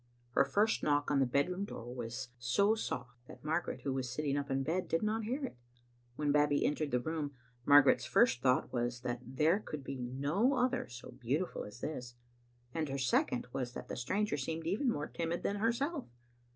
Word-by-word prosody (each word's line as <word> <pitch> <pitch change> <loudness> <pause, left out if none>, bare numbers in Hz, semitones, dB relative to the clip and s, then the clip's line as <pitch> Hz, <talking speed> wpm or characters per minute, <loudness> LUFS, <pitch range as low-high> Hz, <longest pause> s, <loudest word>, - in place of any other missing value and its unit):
Her - - +5
first 215 +2 +2
knock 145 -1 +2
on 145 - +3
the 135 - +3
bedroom 180 +10 +1
door 120 - -6
was 120 +1 -5
so 200 - +3
soft 125 - -4
that - - -12
Margaret, 160 +3 -1
who 135 - -1
was 130 -2 -2
sitting 145 -1 -1
up 140 0 -2
in 135 0 +1
bed, 170 +6 -1
did 165 - 0
not 215 +1 0
hear 265 +5 -1
it. 240 - -8 0.6
When 150 +1 +1
Babbie 145 0 +3
entered 150 0 0
the 125 - +2
room, 145 +1 -3 0.3
Margaret's 145 -1 +7
first 125 0 +4
thought 130 0 +2
was 120 -1 -1
that 120 0 -2
there 155 +9 +2
could 150 -9 -6
be 135 0 -5
no 145 - +1
other 255 0 +1
so 125 +1 -9
beautiful 130 +8 -2
as 105 +4 -11
this, 125 -5 -5 0.6
and 155 -3 -1
her 135 - -2
second 125 -2 +1
was 125 -2 -2
that - - -7
the - - -3
stranger 200 - 0
seemed 160 +4 -3
even 210 - +1
more 150 -9 -1
timid 170 +1 -3
than 200 - 0
herself. 255 +8 0
145 Hz, 195 wpm, -34 LUFS, 125-185 Hz, 0.6 s, Margaret's